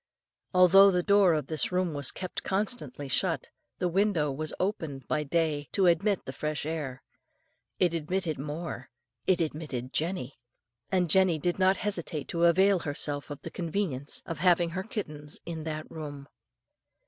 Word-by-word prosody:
"Although 185 +2 +7
the 180 -2 +1
door 200 -4 +5
of 150 -3 -1
this 155 +3 0
room 180 -2 0
was 145 -1 0
kept 185 -1 -5
constantly 190 - -2
shut, 130 - 0 0.3
the 180 - 0
window 175 -5 +2
was 155 +3 -3
opened 160 - -3
by 150 - 0
day 150 -1 0
to 195 - +3
admit 190 +3 +2
the - - -6
fresh 150 -1 -3
air. 150 -5 -4 0.7
It 175 -2 +2
admitted 165 -1 -2
more, 150 -2 -5 0.4
it 185 -2 +4
admitted 150 -6 -3
Jenny, 155 -7 -2 0.5
and 180 -2 +2
Jenny 185 0 +4
did 175 +5 -1
not 190 +1 +4
hesitate 170 -8 -2
to 170 0 +2
avail 190 +3 +5
herself 145 -2 -4
of 145 -1 -8
the - - -6
convenience 165 -6 -2
of 165 -3 -5
having 175 -1 +3
her 185 +2 -2
kittens 155 -8 -5
in 160 -2 -5
that 155 -1 -4
room. 145 -3 -7
165 Hz, 160 wpm, -29 LUFS, 150-185 Hz, 0.7 s, Although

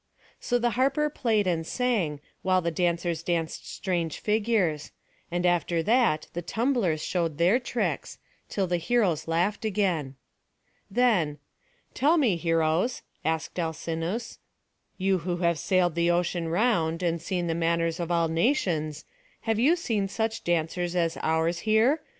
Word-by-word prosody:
So 245 - 0
the 240 0 +1
harper 275 +5 +1
played 220 -7 +1
and 170 -3 0
sang, 185 - -1 0.2
while 185 0 +3
the 170 -1 -1
dancers 170 -1 0
danced 165 -2 -2
strange 170 -5 -2
figures; 210 -8 0 0.4
and 175 +1 -1
after 170 -1 +1
that 220 -8 +2
the 175 - -3
tumblers 220 - 0
showed 165 -5 -1
their 180 +9 +4
tricks, 245 -1 -3 0.3
till 195 - 0
the 180 -1 0
heroes 175 -4 +1
laughed 175 +7 0
again. 185 -10 0 0.7
Then, 195 -10 +2 0.6
"Tell 300 +7 +3
me, 245 - +3
heroes," 165 +6 +1 0.2
asked 160 +2 -2
Alcinous, 165 +6 -3 0.6
"you 190 -1 +1
who 175 +1 -2
have 170 -2 +2
sailed 180 -3 +2
the 170 +1 +1
ocean 175 -1 0
round, 170 -4 +1
and 170 -1 0
seen 180 0 -2
the 165 - 0
manners 165 0 0
of 170 -1 -3
all 170 -1 +2
nations, 165 - 0 0.4
have 225 -1 0
you 290 +9 +5
seen 225 - -1
such 220 +3 -2
dancers 175 +1 -1
as 170 -2 +1
ours 160 +2 +1
here? 225 - +3
175 Hz, 145 wpm, -27 LUFS, 165-220 Hz, 0.7 s, you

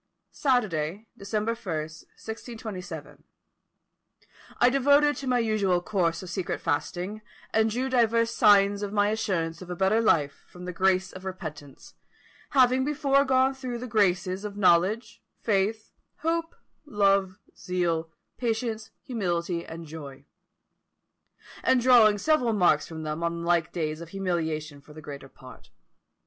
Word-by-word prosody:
"Saturday, 210 - 0
December 215 +3 -2
1, - - -7 0.2
1627, 200 +6 -8 1.3
I 245 - +5
devoted 285 +2 +4
to 270 - -6
my 250 -1 +2
usual 215 -6 +1
course 175 -2 -1
of 185 - -8
secret 185 -1 -3
fasting, 175 +6 -2 0.3
and 220 0 +3
drew 250 +4 -1
divers 230 -2 +2
signs 200 -2 +4
of 205 -1 -3
my 205 0 +2
assurance 185 -7 -2
of 180 - -10
a 180 - -3
better 195 +5 +2
life 150 -10 +1
from 180 0 -11
the 180 - -5
grace 185 +1 +2
of 185 - -10
repentance, 155 -7 -8 0.6
having 260 -1 +4
before 280 -1 +2
gone 265 0 +3
through 255 -2 -5
the 245 - -6
graces 190 -4 +1
of 205 -1 -6
knowledge, 190 +4 +2 0.2
faith, 215 +1 0 0.3
hope, 330 +1 -1 0.3
love, 195 -7 +1 0.2
zeal, 170 -3 -1 0.3
patience, 225 -2 -2
humility, 175 -7 -2
and 165 0 -9
joy; 145 -3 -10 1.4
and 260 -1 +4
drawing 235 -4 +6
several 245 0 +2
marks 175 -7 +3
from 160 -1 -7
them 155 +1 -4
on 170 0 -2
like 170 -1 +1
days 155 -2 -3
of 170 - -9
humiliation 160 -6 -3
for 150 - -16
the 155 - -10
greater 140 -2 -9
part. 130 -2 -15
195 Hz, 135 wpm, -27 LUFS, 170-230 Hz, 1.4 s, drawing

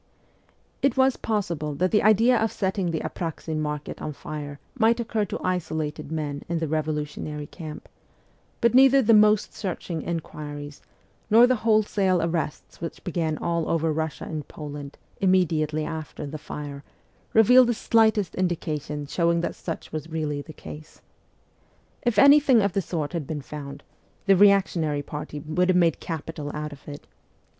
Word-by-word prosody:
It 275 -2 +2
was 265 0 +4
possible 170 -9 -2
that 180 +5 +1
the 210 - +4
idea 225 +4 +5
of 225 -1 +1
setting 190 -2 -1
the 160 -2 -2
Apraxin 160 -2 -4
market 150 -1 -4
on 150 - -4
fire 145 0 -7
might 230 -2 +3
occur 225 -2 -1
to - - -5
isolated 155 -4 -2
men 145 -3 -3
in 170 - 0
the 160 -1 -1
revolutionary 150 -1 -3
camp, 155 -1 -9 0.7
but 235 -1 +3
neither 270 +1 +6
the 230 +1 +5
most 210 0 +4
searching 175 -4 -4
inquiries 145 -3 -6 0.5
nor 230 +3 +8
the 255 0 +2
wholesale 210 -4 +2
arrests 165 -2 -3
which 165 - -6
began 165 -4 -1
all 170 -1 -1
over 165 -1 +1
Russia 160 0 -3
and 155 -2 -5
Poland 145 -2 -8 0.2
immediately 155 -5 +2
after 155 -2 -6
the 150 +2 -6
fire 145 -1 -7 0.5
revealed 250 +3 +7
the 240 - +1
slightest 220 -3 +2
indication 155 -5 -2
showing 170 +3 +1
that - - -2
such 165 - -6
was 155 +1 -5
really 155 -3 -2
the 155 - -11
case. 155 0 -11 1.0
If 240 -2 0
anything 280 -4 +7
of 200 -3 0
the 195 - +1
sort 160 -4 -3
had 165 -5 -3
been 150 -2 -4
found, 140 0 -8 0.4
the 195 -1 +5
reactionary 180 -7 +3
party 150 +1 -6
would 175 +5 0
have 185 - +4
made 170 -3 +3
capital 160 -2 -5
out 150 0 -4
of 140 - -16
it. 145 -1 -8
165 Hz, 155 wpm, -25 LUFS, 150-205 Hz, 1.0 s, nor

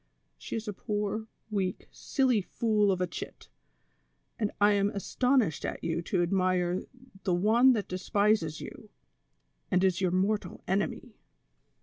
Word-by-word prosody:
She - - -6
is 225 0 -4
a 210 - -2
i)oor, 210 +2 -3 0.2
weak, 190 -3 -2
silly 255 -6 +1
fool 210 +1 +1
of 185 -1 -1
a - - +3
chit, 175 - -8 0.9
and 210 -2 0
I 205 0 +5
am 200 0 +2
astonished 225 - +1
at - - -4
you 165 0 -1
to 175 +1 0
admire 185 0 +1 0.4
the 180 - +1
one 230 +8 +5
that 215 -4 -2
despises 185 -3 +1
you, 215 - -10 0.8
and 185 -1 +2
is 185 -1 +2
your 185 - +2
mortal 190 +1 -1
enemy." 195 +2 -2
200 Hz, 140 wpm, -29 LUFS, 185-215 Hz, 0.9 s, I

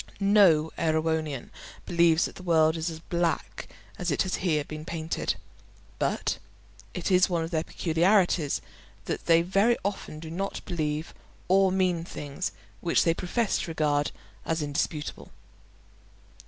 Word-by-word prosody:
No 195 -6 +5
Erewhonian 160 -3 0 0.3
believes 170 -1 +4
that - - -6
the - - -11
world 160 -3 +3
is 165 +1 -2
as 160 - -6
black 170 0 -2 0.3
as 180 -1 -1
it 145 - +2
has 185 - -3
been - - -9
here 155 -5 +1
painted, 155 +2 -3 0.6
but - - 0 0.6
it - - -2
is 185 +1 +5
one 170 -2 0
of 165 - -5
their 160 -2 0
peculiarities 175 -2 +2 0.4
that - - -4
they 165 0 +5
very 200 +6 +3
often 195 -6 -3
do 160 0 -8
not 195 +4 -4
believe 155 -2 -2 0.3
or 190 0 +4
mean 185 -3 +1
things 150 +1 -5 0.3
which 170 - +2
they 165 - +3
profess 200 +6 0
to - - -3
regard 150 -2 +1 0.3
as 160 -1 -1
indisputable. 150 +1 -3
165 Hz, 140 wpm, -27 LUFS, 155-180 Hz, 0.6 s, No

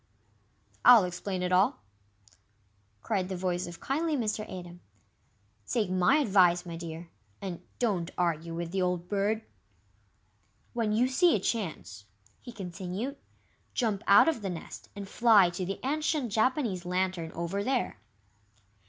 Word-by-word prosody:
"I'll 240 -4 +9
explain 180 +1 -3
it 180 - -1
all," 185 - +3 1.2
cried 190 -4 -1
the 190 - -3
voice 180 -1 -1
of 170 -1 -9
kindly 305 +2 -1
Mr. 220 -3 -1
Atom. 175 -1 -8 0.9
"Take 210 -6 0
MY 185 +9 +4
advice, 185 - +4
my 170 -1 -6
dear, 165 0 -8 0.3
and 180 -3 -6 0.2
don't 190 -8 0
argue 170 -1 -1
with 170 0 -4
the 190 0 -1
old 180 -1 -1
Bird." 210 +3 0 1.3
"When 230 -3 0
you 230 +4 +3
see 335 +7 +4
a - - +1
chance," 160 - -4 0.4
he 245 - -9
continued, 195 +6 -5 0.6
"jump 220 -6 0
out 200 +8 +7
of 315 -8 +1
the 195 - -3
nest 170 -3 -8
and 200 -1 -6
fly 205 -5 +5
to 175 +1 -4
the 195 - -4
ancient 300 -3 0
Japanese 220 - +1
Lantern 180 -2 -1
over 170 +4 -2
there." 255 +1 -1
190 Hz, 140 wpm, -29 LUFS, 175-230 Hz, 1.3 s, I'll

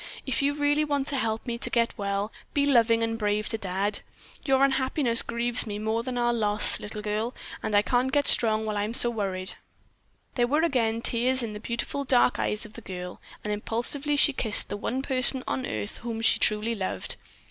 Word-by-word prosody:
If 265 - -1
you 285 +1 +1
really 290 +1 +1
want 285 -2 -1
to 285 - -1
help 225 -4 -2
me 235 -2 -4
to - - +2
get 235 -1 0
well, 200 +1 -3 0.2
be 285 -1 +2
loving 230 -4 +3
and 225 0 -2
brave 210 0 0
to 225 - 0
Dad. 200 +1 -2 0.4
Your 270 -1 +2
unhappiness 260 -2 0
grieves 235 0 +2
me 205 -1 -4
more 220 +2 -1
than 250 +1 -5
our 240 0 +1
loss, 210 -2 +5
little 210 0 -7
girl, 215 +3 -3 0.3
and 210 - -2
I 205 - +4
can't 250 +3 0
get 285 0 +1
strong 220 -1 +3
while 215 -1 -3
I 205 - 0
am 220 +3 -3
so 240 - +4
worried." 190 -4 -3 0.8
There 240 -1 +1
were 300 +5 +1
again 230 -7 0
tears 250 +2 +2
in 220 -2 -5
the 210 - -7
beautiful 235 +5 -4
dark 250 -2 +3
eyes 210 +2 -2
of 215 - -13
the 230 - -10
girl, 180 -3 -8 0.2
and 210 - -2
impulsively 245 +7 -2
she 290 0 +5
kissed 220 -5 +1
the - - -3
one 255 +5 -3
person 260 -1 +2
on 130 0 -2
earth 105 -1 -5
whom 230 -1 -5
she 225 - +4
truly 215 +2 +2
loved. 190 - -2
230 Hz, 210 wpm, -26 LUFS, 210-260 Hz, 0.8 s, loss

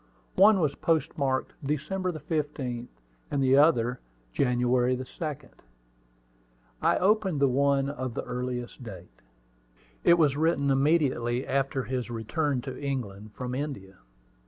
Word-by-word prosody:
One 200 +1 +7
was 150 -5 +1
postmarked 140 -5 0
December 155 +7 -2
15th, 145 -7 -3 0.4
and 140 -1 0
the 130 0 +4
other 125 -5 +4 0.3
January 125 - +2
2d. 140 +3 -6 1.3
I - - +3
opened 195 -5 +2
the 140 - +4
one 140 +1 +2
of 130 -4 -4
the - - -3
earliest 125 0 -5
date. 95 -7 -11 0.8
It 170 - +6
was 150 -5 +3
written 145 -2 +2
immediately 135 -4 +1
after 135 0 0
his 125 -2 -3
return 125 +4 -1
to 130 +2 -7
England 110 -7 -4
from 125 -1 -4
India. 125 -9 -5
135 Hz, 120 wpm, -28 LUFS, 125-150 Hz, 1.3 s, One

